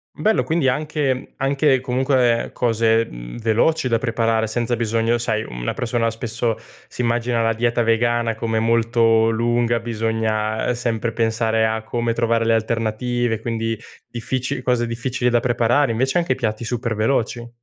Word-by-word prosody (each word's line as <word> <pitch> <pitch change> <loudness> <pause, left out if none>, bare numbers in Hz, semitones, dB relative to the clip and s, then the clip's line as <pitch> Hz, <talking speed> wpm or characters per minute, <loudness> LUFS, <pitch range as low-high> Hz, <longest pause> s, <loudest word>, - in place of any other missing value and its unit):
Bello 220 +1 +2
quindi 160 -3 0
anche 150 0 0
mhmm, 130 - -8
anche 135 0 +2
comunque 125 -2 +1
cose, 115 -1 +2
mhmm, - - -9
veloci 120 +7 +1
da 115 -2 +2
preparare 115 -2 0
senza 120 +1 -1
bisogno 115 0 +1
sai 110 -2 -1
una - - -4
persona 115 -1 0
spesso 115 0 -2 0.3
si - - -4
immagina 120 0 0
la 115 0 +2
dieta 120 +1 0
vegana 115 0 +1
come 110 0 -2
molto 115 0 +3
lunga, 120 +1 +1
bisogna 110 0 -1
sempre 115 -1 -2
pensare 115 -1 +1
a 110 0 -1
come 120 0 -1
trovare 115 0 +1
le 115 0 +3
alternative 115 +1 -1
quindi 115 -1 -2 0.3
difficili 125 +2 -3
cose 125 -2 +1
difficili 120 +1 -1
da 120 - +3
preparare 120 +3 +2
invece 130 +8 +1
anche 170 -7 +1
piatti 110 -2 -3
super 115 -1 -2
veloci. 120 +1 0
115 Hz, 150 wpm, -21 LUFS, 115-120 Hz, 0.3 s, molto